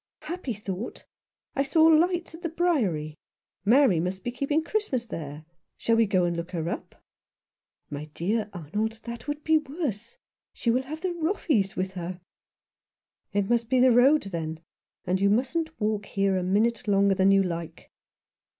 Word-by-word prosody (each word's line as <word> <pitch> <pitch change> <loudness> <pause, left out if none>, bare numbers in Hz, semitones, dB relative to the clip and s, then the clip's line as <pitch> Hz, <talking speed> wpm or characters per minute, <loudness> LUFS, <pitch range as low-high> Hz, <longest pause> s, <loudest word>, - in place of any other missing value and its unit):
" - - -67
Happy 350 -7 -4
thought! 200 +2 -6 0.5
I 275 - +2
saw 295 +4 +3
lights 340 +2 +3
at 325 - -10
the 335 - -2
Briery; 235 - 0 0.5
Mary 230 - +5
must 180 +3 -3
be 240 - -2
keeping 285 +5 0
Christmas 330 - -1
there. 155 -7 -7 0.3
Shall 230 - +2
we 225 -1 +4
go 185 -2 +2
and 175 0 0
look 170 +1 -4
her 165 -2 -2
up? - - -6 0.5
" - - -59
"My 145 +1 -5
dear 210 +5 -1
Arnold, 205 +6 -3
that 235 +3 -7
would 295 0 -3
be 315 0 +4
worse. 295 - -4 0.4
She 235 - 0
will 250 +2 +2
have 305 +4 -7
the 370 -1 -1
Roffeys 315 - 0
with 185 0 -2
her! 180 0 -5 0.4
" - - -67
" - - -54
It 200 -1 +1
must 235 0 +1
be 260 0 +3
the 255 0 +6
road, 265 +6 +5
then; 165 -4 -5 0.4
and 185 +1 0
you 200 - +4
mustn't 315 +9 0
walk 210 -2 -1
here 195 -1 +1
a 185 - +1
minute 215 +6 +1
longer 200 -1 +4
than 190 +1 +3
you 195 0 +5
like." 170 -3 -6
220 Hz, 180 wpm, -27 LUFS, 185-290 Hz, 0.5 s, the